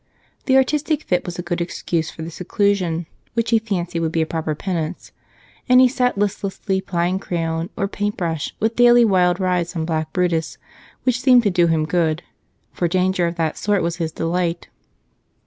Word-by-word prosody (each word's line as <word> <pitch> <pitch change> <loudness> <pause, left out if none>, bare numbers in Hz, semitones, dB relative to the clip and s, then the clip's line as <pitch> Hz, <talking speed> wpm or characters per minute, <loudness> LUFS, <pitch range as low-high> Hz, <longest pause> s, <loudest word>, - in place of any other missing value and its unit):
The 265 -1 +5
"artistic 300 +3 +1
fit" 180 0 -1
was 175 - -5
a 175 - -4
good 175 0 -2
excuse 170 -2 -2
for 160 - -8
the 165 - -6
seclusion 180 -1 0 0.3
which 230 0 0
he 225 - +5
fancied 180 -6 -3
would 165 -1 -1
be 165 -1 +1
a - - -2
proper 160 -1 -3
penance, 170 0 -4 0.6
and 250 0 +7
he 255 - +7
sat 250 -3 0
listlessly 195 -1 -1
plying 180 -1 -1
crayon 165 -2 -2
or 195 - 0
paintbrush, 185 -7 -3
with 220 +1 0
daily 240 0 +6
wild 180 -3 +3
rides 180 -2 0
on 160 -1 -1
black 160 -1 -2
Brutus, 175 -3 0 0.5
which 255 -1 +1
seemed 255 -2 +6
to 205 - +2
do 175 -1 +3
him 160 -2 +1
good, 165 0 0 0.5
for 175 - 0
danger 185 0 +1
of 170 - -4
that 160 -2 -2
sort 205 -3 +1
was 170 +1 -2
his 165 -2 -2
delight. 170 +1 -2
180 Hz, 180 wpm, -21 LUFS, 165-205 Hz, 0.6 s, and